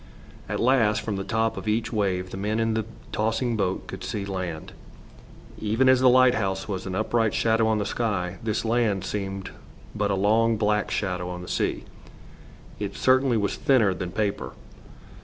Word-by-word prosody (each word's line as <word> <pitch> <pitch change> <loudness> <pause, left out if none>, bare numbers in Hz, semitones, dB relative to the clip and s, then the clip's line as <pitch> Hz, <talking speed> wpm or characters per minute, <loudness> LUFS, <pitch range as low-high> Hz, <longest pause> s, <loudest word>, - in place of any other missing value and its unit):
At - - -2
last, 115 -4 +3
from 105 - -3
the 95 - -3
top 110 +2 0
of - - -6
each 110 +2 0
wave 95 -3 -1
the - - -6
men 105 +3 -1
in 115 0 +1
the 110 -1 -1 0.3
tossing 115 +2 0
boat 95 -3 -1
could 95 -1 -8
see 100 +2 -3
land. 90 -5 -5 0.9
Even 110 +5 +1
as 130 -1 +6
the 130 0 +6
lighthouse 110 -7 +3
was 95 -2 -4
an 95 - -3
upright 115 +1 +1
shadow 110 0 +2
on 110 -1 +2
the 105 - -1
sky, 100 -5 -2
this 110 0 -2
land 110 -5 +1
seemed 95 -1 -4 0.4
but 105 0 -1
a 100 - +1
long 110 +3 +3
black 105 0 +1
shadow 90 -3 -2
on 90 0 -6
the - - -9
sea. - - -1 1.0
It - - -4
certainly 130 -2 +3
was 100 -2 -1
thinner 130 -9 +3
than 90 -1 -5
paper. 105 0 -2
105 Hz, 175 wpm, -25 LUFS, 95-115 Hz, 1.0 s, as